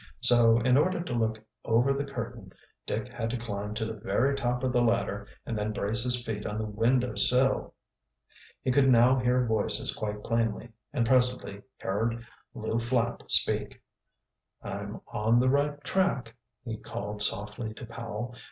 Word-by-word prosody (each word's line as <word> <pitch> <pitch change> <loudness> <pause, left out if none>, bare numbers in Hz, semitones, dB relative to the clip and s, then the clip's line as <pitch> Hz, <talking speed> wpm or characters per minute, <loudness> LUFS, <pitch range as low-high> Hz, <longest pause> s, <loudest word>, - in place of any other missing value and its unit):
So, 115 -2 +5
in 125 +2 +3
order 180 +5 +2
to 145 - -5
look 110 -2 0 0.3
over 120 +4 +3
the 140 +1 -2
curtain, 120 -7 -7 0.3
Dick - - -2
had 115 -1 -4
to 125 - -2
climb 105 -2 -5
to 110 0 -2
the 110 - -4
very 120 +5 0
top 125 -1 -1
of 130 -1 0
the 120 - +3
ladder 110 -3 0 0.2
and 115 - -3
then 105 0 -1
brace 105 +2 +3
his 125 -1 +1
feet 105 -3 -4
on 105 - -4
the 110 - -2
window 120 +3 +1
sill. 125 +6 +2 0.9
He 130 - +1
could 135 +1 +4
now 125 +1 +5
hear 125 0 +2
voices 110 -1 +2
quite 105 -1 -4
plainly, 115 0 -1 0.2
and 125 -5 0
presently 125 -5 +1 0.2
heard 115 +4 -2 0.3
Lew 110 -1 -2
Flapp 120 0 -1
speak. - - +2 0.8
"I'm - - -6
on 110 +3 +1
the 130 +1 +3
right 145 +1 +1
track," 140 -11 0 0.3
he 110 -2 -4
called 105 0 -6
softly 105 +2 -1
to 120 - -8
Powell. 115 +1 -6
115 Hz, 165 wpm, -28 LUFS, 110-125 Hz, 0.9 s, So